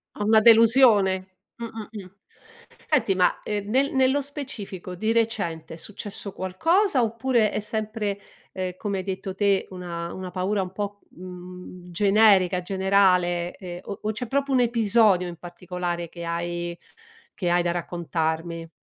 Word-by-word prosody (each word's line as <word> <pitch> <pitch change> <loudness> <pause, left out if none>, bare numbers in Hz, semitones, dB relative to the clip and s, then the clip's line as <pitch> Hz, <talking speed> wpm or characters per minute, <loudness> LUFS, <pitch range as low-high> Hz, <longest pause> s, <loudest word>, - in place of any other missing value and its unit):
A 210 - -3
una 220 +1 +5
delusione? 220 -5 +5 0.2
Mh, 235 - -6
mh, 220 -2 -7
mh, 200 -4 -9 0.8
senti 260 -10 +2
ma, 180 -1 +2
ehm, 205 -1 -3
nel 270 +5 +2
nello 265 +1 +3
specifico 225 -10 -7
di 220 +5 0
recente 200 -9 -1
è - - -12
successo 200 +2 -7
qualcosa 285 - +1
oppure 230 -1 +1
è - - -1
sempre, 210 -1 -3 0.3
ehm, 185 -1 -3
come 200 -1 -2
hai - - -4
detto 190 0 -5
te 200 -1 +2
una 170 -2 -6
una 185 -1 -6
paura 190 +3 -1
un 180 - -7
po', 205 +1 -5
mhmm, 180 0 -10
generica, 195 -1 +4
generale, 180 -2 +2
ehm, 175 -2 -8
o 200 - -7
o 215 - 0
c'è 225 +3 -5
proprio 280 +3 -1
un 260 -2 +4
episodio 220 -5 +3
in 175 - -7
particolare 175 -1 -5
che 170 +1 -9
hai 170 0 -3 0.6
che 180 - -1
hai 175 0 +3
da 175 - 0
raccontarmi? 165 -1 -3
195 Hz, 155 wpm, -25 LUFS, 180-220 Hz, 0.8 s, una